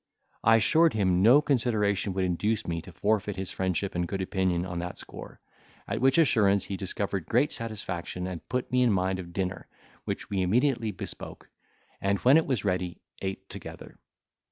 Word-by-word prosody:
I 115 +1 +6
assured 160 +9 +4
him 95 -4 +2
no 125 +9 +7
consideration 110 -8 +1
would 95 0 0
induce 105 +5 0
me 85 -1 -2
to 85 - -12
forfeit 105 +4 0
his 95 -1 -4
friendship 95 +1 -1
and 85 0 -1
good 95 +1 -3
opinion 95 -2 0
on 90 -2 -4
that 90 +1 -5
score; - - -10 0.5
at - - -2
which 135 +3 +4
assurance 105 - +4
he 100 - -4
discovered 95 -2 -3
great 130 +6 +2
satisfaction, 95 -5 -5
and 90 -3 -7
put 125 +1 -2
me 125 0 +3
in 125 -2 +4
mind 95 -1 0
of 85 -2 -8
dinner, 95 0 -3 0.4
which - - -4
we 95 -2 -1
immediately 115 +4 +2
bespoke, 105 - -6 0.5
and 100 +1 +1
when 130 +5 +6
it 160 - +2
was 125 -7 -1
ready, 90 -2 -2 0.2
ate 95 0 -4
together. - - -10
100 Hz, 180 wpm, -28 LUFS, 90-115 Hz, 0.5 s, no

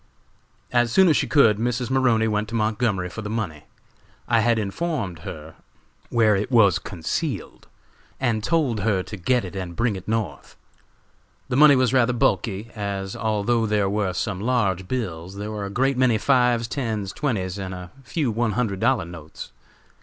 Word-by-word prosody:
"As 120 -1 +2
soon 190 +6 +5
as 155 - +4
she - - 0
could, 115 -8 +4
Mrs. 125 +2 -1
Maroney 125 -4 +3
went 105 0 -1
to 115 - -4
Montgomery 110 -4 0
for 100 +5 -7
the 105 - -5
money. 100 -10 -4 0.6
I 115 -1 +3
had 115 +1 +2
informed 110 - -3
her 80 0 -8 0.6
where 110 -3 +3
it 100 +2 -2
was 110 - +5
concealed, 95 - -4 0.5
and 115 -5 0
told 145 -7 +1
her 100 -2 +1
to 105 - -8
get 115 +5 +1
it 90 - -8
and 90 -3 -5
bring 115 0 0
it 95 - -9
North. 105 -10 -3 0.9
"The - - -1
money 150 -1 +8
was 130 -1 +2
rather 125 -1 +3
bulky, 115 -4 0
as 100 -1 -4
although 110 +1 0
there 105 -2 +1
were 100 -3 0
some 95 +1 -2
large 100 -6 0
bills, 95 -7 -4
there 105 +1 -5
were 105 -2 -4
a - - -5
great 130 +5 +1
many 125 -4 +4
fives, 125 -1 +2
tens, 110 -7 -3
twenties 100 - -2
and 95 -1 -5
a 90 -1 -8
few 135 -1 -1
one 110 0 0
hundred 105 -4 -1
dollar 120 -6 +2
notes. 80 -7 -10
110 Hz, 175 wpm, -23 LUFS, 95-125 Hz, 0.9 s, money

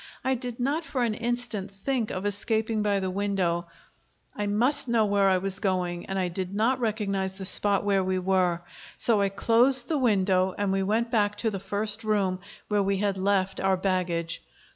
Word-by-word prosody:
I 265 - +1
did 245 -1 -5
not 285 +7 0
for 265 -6 -2
an 230 -2 0
instant 235 -3 -3
think 225 +4 -2
of 185 +2 -4
escaping 220 +2 0
by 205 -1 +1
the 190 -1 -2
window; 185 -3 -1 0.7
I 205 - -2
must 250 +7 +3
know 230 -2 +2
where 200 -1 +2
I 190 - +3
was 195 +1 -1
going, 180 -3 -2
and 195 - -3
I 185 -1 0
did 185 +2 -5
not 240 +5 +1
recognize 200 -4 -2
the 190 0 -5
spot 200 +1 +4
where 195 -2 +2
we 185 0 -1
were. 180 -2 +1 0.3
So 220 -4 +3
I 200 - +2
closed 240 +6 +3
the 310 -3 0
window, 190 -6 +2
and 205 -1 0
we 195 0 0
went 225 +5 0
back 210 -3 +1
to 225 - -1
the 195 - -4
first 205 +3 -2
room, 200 -4 0 0.3
where 210 -1 +1
we 195 0 0
had 200 0 0
left 195 0 0
our 190 -1 +1
baggage. 180 -3 -2
200 Hz, 195 wpm, -26 LUFS, 190-225 Hz, 0.7 s, spot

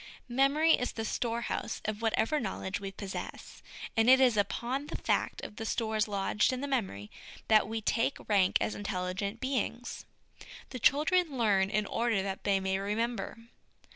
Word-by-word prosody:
Memory 285 +5 +4
is 250 - 0
the 225 - -3
storehouse 235 +1 -2
of 215 0 -3
whatever 230 +5 +1
knowledge 190 -4 -3
we 195 -1 -5
possess; 195 0 -7 0.3
and 225 +2 +4
it 260 0 +8
is 255 -4 +5
upon 245 +7 -1
the - - -4
fact - - -1
of 210 - -8
the 225 - -4
stores 220 -2 0
lodged 200 +2 +1
in 255 - -3
the 285 - -3
memory 190 - -2 0.4
that 215 -2 +5
we 225 +1 -3
take 230 +5 +1
rank 195 -3 +4
as - - -1
intelligent 200 +2 -3
beings, 245 -2 -3 0.6
The 255 - -5
children 305 +3 +3
learn 200 -5 +3
in 210 +1 0
order 230 -2 0
that 195 -1 -5
they 195 -1 +3
may 190 0 0
remem 215 +5 -1
ber. 195 - -6
220 Hz, 170 wpm, -31 LUFS, 200-250 Hz, 0.6 s, it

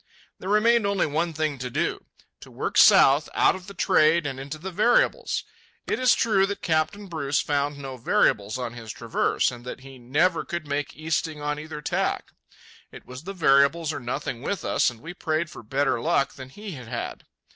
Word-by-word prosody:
There 190 - -6
remained 215 +1 +4
only 200 -1 +1
one 160 +3 -1
thing 155 -3 -2
to 125 0 -4
do—to - - -5
work - - -4
south 140 +3 +6
out - - +4
of 185 -1 -10
the 200 - -10
trade 160 0 +3
and 135 -2 -4
into 140 +3 -6
the 185 +5 -7
variables. 240 - +2 0.4
It - - -1
is 255 -2 +5
true 195 -4 +2
that 200 - -5
Captain 165 +6 0
Bruce 155 -6 -1
found 145 0 -1
no 135 -2 -7
variables 105 -2 +1
on 120 -2 -4
his 115 -3 -8
traverse, - - 0
and 120 -1 -10
that 125 +1 -7
he 135 -1 -12
"never 155 +9 +1
could 170 -2 -5
make 145 0 -3
easting 155 0 -2
on 150 0 -2
either 150 -1 -8
tack." - - -1 0.6
It - - -12
was 130 +5 -10
the 195 - -5
variables 155 -1 +3
or - - -4
nothing 125 0 -4
with 185 +3 -3
us, - - +2
and 120 -2 -12
we 165 +3 -8
prayed 155 -1 -2
for - - -10
better 135 +1 0
luck 155 -2 +1
than 130 -1 -10
he 205 +8 -9
had 125 -8 -9
had. 120 0 -5
150 Hz, 195 wpm, -25 LUFS, 135-175 Hz, 0.6 s, south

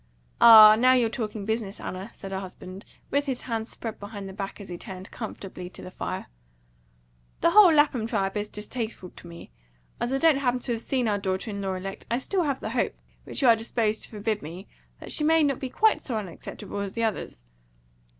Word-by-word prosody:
"Ah, 215 -2 +11
now 255 +2 +6
you're 240 -3 +2
talking 215 -4 -4
business, 220 -2 -3
Anna," 185 +4 -6
said 195 - -8
her 190 - -2
husband, 185 +1 -9 0.3
with 285 +1 +1
his 260 -2 -2
hands 225 -2 -4
spread 225 -2 -6
behind 205 -1 -7
the 190 - -8
back 195 0 -5
he 195 -4 -8
turned 185 +2 -8
comfortably 195 -5 -7
to - - -10
the 185 - -9
fire. - - -5 1.2
"The 335 - +4
whole 390 -2 +8
Lapham 290 -7 +3
tribe 195 -4 -1
is 210 0 -2
distasteful 215 -3 -6
to - - -14
me. 170 - -11 0.5
As 240 - -1
I 270 - +1
don't 320 -1 +4
happen 250 -2 +1
to 245 - -3
have 230 -1 -2
seen 255 -2 0
our 205 -1 +1
daughter 190 +2 -2
in 200 0 -5
law 190 -1 -2
elect, 195 +1 -7
I 235 - +1
have 260 - -3
still 390 -2 0 0.2
the - - -5
hope - - 0 0.3
which - - -3
you're 235 -3 +7
disposed 225 -1 -1
to - - -11
forbid 210 0 -2
me 175 +6 -9 0.3
that - - -7
she 300 - +2
may 320 +1 +4
not 280 -3 +1
be 260 - -4
quite 430 - +3
so 245 -6 -3
unacceptable 200 +1 -7
as 200 -1 -4
the 230 - -2
others." 200 - -3
220 Hz, 210 wpm, -26 LUFS, 195-250 Hz, 1.2 s, Ah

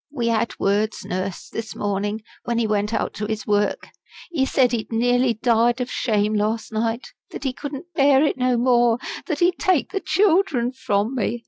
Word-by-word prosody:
"We 240 -5 -1
had 230 0 0
words, 210 +2 0
Nurse, 185 0 -4
this 225 -1 -6
morning, 205 +2 -2 0.2
when 235 -1 -1
he 235 - +1
went 210 0 0
out - - -1
to 210 +1 -4
his 220 -1 -3
work. 205 0 0 0.4
He 270 -6 +1
said 255 -3 +3
he'd 235 -2 -3
nearly 245 +1 +2
died 235 +1 +2
of 250 0 -3
shame 215 -3 0
last 215 +1 -1
night; 225 +2 -2 0.2
that - - -8
he 265 -2 -1
couldn't 290 +6 -8
bear 275 -2 +4
it - - +1
no 255 -1 +1
more; 240 -1 +3 0.3
that 310 -4 -2
he'd 355 0 +3
take 370 -7 +1
the 390 - -1
children 350 - +2
from 215 -3 -1
me. 240 -1 -1
235 Hz, 190 wpm, -22 LUFS, 215-265 Hz, 0.4 s, bear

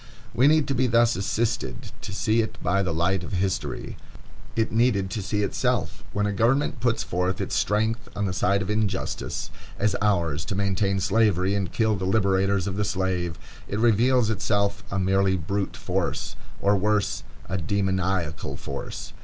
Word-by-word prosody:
We 130 +4 +4
needed 155 -1 +4
to - - +2
be 130 0 +2
thus 115 0 +4
assisted 100 - -2
to - - -6
see 110 +3 +2
it 110 - -4
by 100 +2 +2
the 90 -3 -1
light 85 +3 +1
of - - -7
history. 95 0 -2 0.6
It 110 -1 +1
needed 110 -5 +2
to 105 - -2
see 105 +1 -1
itself. 100 - -1
When 105 0 0
a 105 - 0
government 120 +6 +2
puts 120 -1 +1
forth 90 +2 -1
its - - -3
strength 110 +2 0
on 100 - -1
the 95 - -1
side 100 +2 +2
of 95 - -6
injustice, 105 -3 -2 0.3
as 100 0 +1
ours 85 -7 +1
to 95 - -3
maintain 100 0 +1
Slavery 100 -1 +2
and 95 -4 -1
kill 110 -2 +2
the 95 - -3
liberators 95 -1 +2
of 100 -1 -3
the 105 - +1
slave, 90 -4 -1 0.3
it 100 - -3
reveals 120 +1 +3
itself 100 -1 0
a 100 - -2
merely 95 0 +2
brute 95 +4 -2
force, - - -2 0.3
or 100 +1 +4
worse, 105 +1 +1 0.3
a 95 +1 -2
demoniacal 95 -2 -1
force. 70 - -6
100 Hz, 170 wpm, -25 LUFS, 95-110 Hz, 0.6 s, We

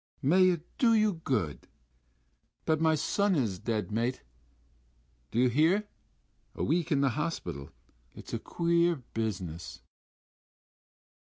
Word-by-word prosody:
"May 185 +7 +5
it 170 -3 -1 0.2
do 230 -3 +5
you 215 -1 +3
good.... 105 - -2 1.0
But 155 0 +1
my 160 -1 +4
son 200 +6 +1
is 110 - 0
dead, 110 -1 -2
mate.... 120 +4 -1 1.1
Do - - -5
you 125 +1 +5
hear? 165 - +2 0.7
This - - -2
week 165 +3 0
in 140 -2 +3
the 140 - +3
hospital.... 115 - -4 0.5
It's - - -11
a - - -1
queer 170 0 +1 0.2
business...." 90 -7 -4
150 Hz, 125 wpm, -30 LUFS, 110-170 Hz, 1.1 s, May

